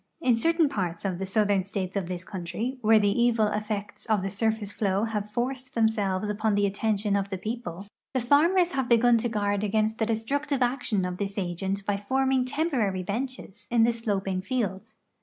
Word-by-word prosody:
In 250 -2 +3
certain 330 +6 +3
parts 180 -8 -3
of 185 -2 -2
the 190 - -3
southern 200 -1 +2
states 190 0 -4
of 195 -3 -1
this 180 -1 -5
countrv, 200 +9 -4
where 220 0 +5
the 205 +3 +2
evil 235 -2 +3
effects 210 0 -4
of 215 -4 +2
the 195 - -2
surface 220 0 -1
flow 200 -1 0
have 210 -2 -2
forced 255 +3 -3
themselves 210 -4 +1
upon 210 0 0
the 205 0 +3
attention 205 0 0
of 200 0 -1
the 190 - -3
])eo])le, 200 -3 -5 0.3
the - - +3
farmers 335 +8 +4
have 265 -2 -1
begun 235 0 +5
to 240 +1 -1
guard 205 -2 0
against 215 +1 0
the 220 - +1
destructive 270 +5 0
action 240 -6 0
of 180 0 -4
this 200 0 -4
agent 195 +1 -2
liy 205 0 -1
forming 265 +2 +1
temporary 255 - 0
benches 210 -1 -5
in 235 -1 +4
the 235 +1 +3
sloping 195 -5 -2
fields. 215 -1 -3
215 Hz, 190 wpm, -27 LUFS, 195-240 Hz, 0.3 s, where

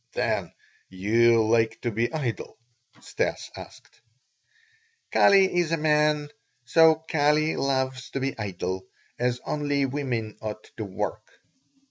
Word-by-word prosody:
"Then - - -1 0.4
you 115 +4 +3
like 115 0 +2
to 120 - -1
be 115 +3 -1
idle?" 140 -8 -4 0.4
Stas - - -3
asked. - - -13 1.1
"Kali 195 -2 +5
is 170 -2 0
a 165 - +2
man, 150 -1 +2 0.4
so 160 +6 +6
Kali 155 -1 +1
loves 130 -2 -1
to 135 - -4
be 135 +1 -2
idle, 95 -2 -4 0.3
as 125 0 0
only 145 -2 0
women 130 -6 -3
ought 110 0 -6
to 110 - -4
work." 105 +2 -5
130 Hz, 120 wpm, -26 LUFS, 110-150 Hz, 1.1 s, so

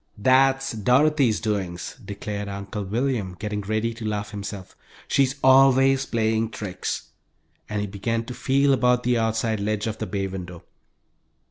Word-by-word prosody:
"That's 135 +4 +3
Dorothy's 125 +2 +3
doings!" 95 -6 -3
declared 100 0 -5
Uncle 100 +1 -5
William, 110 -2 -1
getting 105 +1 -3
ready 110 +3 -1
to 115 0 -9
laugh 105 -1 -3
himself. 100 -2 -7 0.3
"She's 135 -1 +2
always 135 0 +5
playing 110 -1 0
tricks," 105 -4 -5 0.6
and 105 -1 -2
he - - -1
began 115 +3 -2
to 125 - -6
feel 140 +2 +2
about 125 -1 +2
the 120 -1 +2
outside 110 -1 0
ledge 105 0 -1
of 110 -1 -4
the 110 - -3
bay 100 -1 -2
window. 90 -2 -7
110 Hz, 145 wpm, -24 LUFS, 100-125 Hz, 0.6 s, always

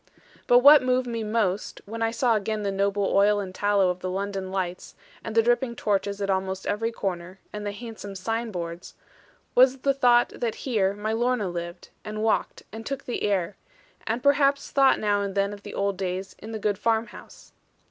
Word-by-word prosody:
But 245 0 +6
what 290 0 +9
moved 255 0 +1
me 230 -2 -3
most, 210 -3 -1
when 225 +2 -7
I 225 - +2
saw 235 +1 +1
again 215 0 -1
the 200 - -1
noble 200 +1 0
oil 205 +1 +4
and 190 -2 -5
tallow 200 -1 +2
of 180 - -7
the 185 - -4
London 195 0 -3
lights, 185 -2 -4 0.3
and 225 - -6
the 225 - +5
dripping 240 +1 +1
torches 200 -1 -1
at 200 - -2
almost 190 0 -2
every 225 +3 -1
corner, 185 -3 -5
and 210 0 -5
the - - -2
handsome 205 -2 -8
signboards, 185 -5 -4 0.6
was 255 +1 +5
the 275 0 +2
thought 245 -2 +4
that 230 -2 -3
here 200 -6 +1
my 215 +2 -2
Lorna 240 -2 0
lived, 175 0 -6
and 215 0 -4
walked, 220 - 0
and 225 +1 -8
took 275 +3 -4
the 245 - -3
air, 195 -2 0 0.5
and 230 +3 -1
perhaps 280 0 +3
thought 270 -1 +4
now 205 -1 +1
and 200 -1 -3
then 200 0 +1
of 205 - -10
the - - -9
old 200 -1 -1
days 190 0 -4
in 220 - -9
the 220 - -3
good 205 -2 -1
farm 225 0 +1
house. - - -14
210 Hz, 200 wpm, -25 LUFS, 195-235 Hz, 0.6 s, what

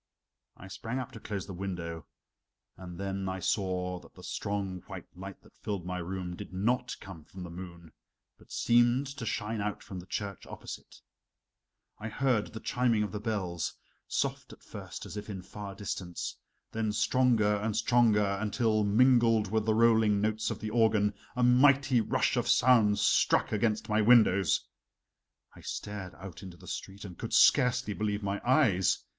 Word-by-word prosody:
I 95 - -11
sprang 115 +6 -5
up 130 -2 -4
to 115 - -10
close 100 -3 -5
the 95 - -8
window, 85 -3 -5 0.7
and 90 -1 -10
then 95 -1 -3
I 95 - -3
saw 90 -2 -1
that - - -18
the - - -13
strong 100 -3 -3
white - - -8
light 95 +1 -9
that - - -21
filled 100 -4 -5
my 90 0 -3
room 90 0 -4
did - - -9
not 110 +7 0
come 95 -5 -10
from 90 +4 -10
the 85 - -8
moon, 85 -2 -10 0.5
but - - -20
seemed 120 +3 +3
to 135 -4 -6
shine 110 -1 -2
out 105 0 -3
from 95 - -7
the 90 - -12
church 100 -2 -5
opposite. - - -10 1.0
I 110 - -5
heard 120 -3 +1
the 110 - -8
chiming 120 -2 +1
of 105 - -4
the 105 - -4
bells, 95 -6 -3 0.3
soft - - -2
at - - -15
first, - - -8
as - - -8
if 105 +1 -7
in 95 -3 -6
far 100 +1 -8
distance, 95 -3 -5 0.4
then 110 -1 -1
stronger 110 -2 +3
and 105 +1 -2
stronger 105 -4 +3
until, 110 0 +1
mingled 115 -1 +4
with 110 0 0
the 110 - +3
rolling 110 -2 +4
notes 110 +1 0
of 110 - -3
the 110 -1 -5
organ, 110 -3 +3 0.2
a 125 - +1
mighty 130 0 +5
rush - - +1
of - - 0
sound 115 -5 +5
struck - - +3
against 110 0 0
my 110 -1 +2
windows. 105 -6 +4 0.9
I - - -13
stared 100 -3 -6
out 95 -2 -10
into 95 -3 -10
the - - -15
street 100 +2 -7
and 90 -3 -10
could - - -5
scarcely 125 -3 +4
believe 105 0 -2
my 100 0 -2
eyes. 115 - +3
105 Hz, 175 wpm, -30 LUFS, 95-115 Hz, 1.0 s, mighty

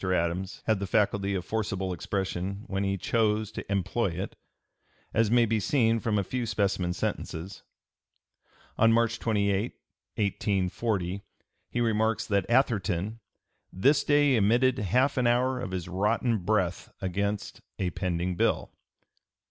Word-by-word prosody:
Adams 95 +2 -1
had 110 -3 +2
the 100 - -3
faculty 100 0 +1
of 90 - -3
forcible 95 -4 -2
expression 95 +2 -3
when 100 -5 -2
he 100 0 0
chose 110 0 +1
to - - -7
employ 100 +4 0
it, 90 +2 -5 0.8
as 115 -1 +3
may 120 +1 +5
be 110 0 +1
seen 115 +1 +2
from 110 -2 0
a 100 - +1
few 120 +4 -3
specimen 100 -4 0
sentences. 90 +1 -4 1.2
On 115 0 +6
March 115 0 +2
28, 100 0 0 0.4
1840, 100 -1 -1 0.5
he 120 - -1
remarks 110 -1 +1
that 100 -2 0
Atherton 110 -4 +1 0.5
"this 140 +10 +3
day 145 -2 +4
emitted 120 +4 +3
half 125 +8 +2
an 125 -2 +3
hour 125 +2 +2
of 100 - -4
his 90 -2 -4
rotten 105 +5 +1
breath 90 -2 -1
against" 100 +2 -2 0.2
a 90 -2 -1
pending 90 0 -2
bill. - - 0
105 Hz, 135 wpm, -28 LUFS, 95-115 Hz, 1.2 s, On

